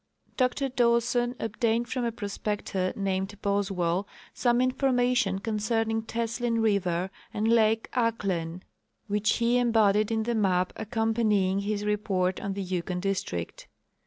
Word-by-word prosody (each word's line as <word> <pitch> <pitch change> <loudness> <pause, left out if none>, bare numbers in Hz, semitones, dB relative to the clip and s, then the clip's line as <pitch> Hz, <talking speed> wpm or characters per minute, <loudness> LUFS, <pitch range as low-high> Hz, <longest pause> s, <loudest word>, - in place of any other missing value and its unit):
Dr 255 +1 +1
Dawson 240 0 +2
obtained 230 +1 0
from 255 -3 -2
a 235 - 0
prospector 205 -3 -3
named 195 0 -2
Boswell 195 -2 0 0.3
some 240 -1 +2
information 250 -5 +2
concerning 225 +2 -1
Teslin 230 +1 -2
river 190 -4 +1 0.2
and 215 +1 -1
lake 225 -1 +3
Ahklen 195 -8 -1 0.4
which 210 0 +1
he 235 +1 +2
embodied 215 -3 +3
in 220 -1 0
the 235 +1 -1
map 185 -4 +1
accompanying 220 -3 +1
his 205 +1 -2
report 195 -3 0
on 200 -1 -3
the 200 0 -3
Yukon 180 -1 -2
district. 180 - -3
215 Hz, 125 wpm, -27 LUFS, 195-235 Hz, 0.4 s, lake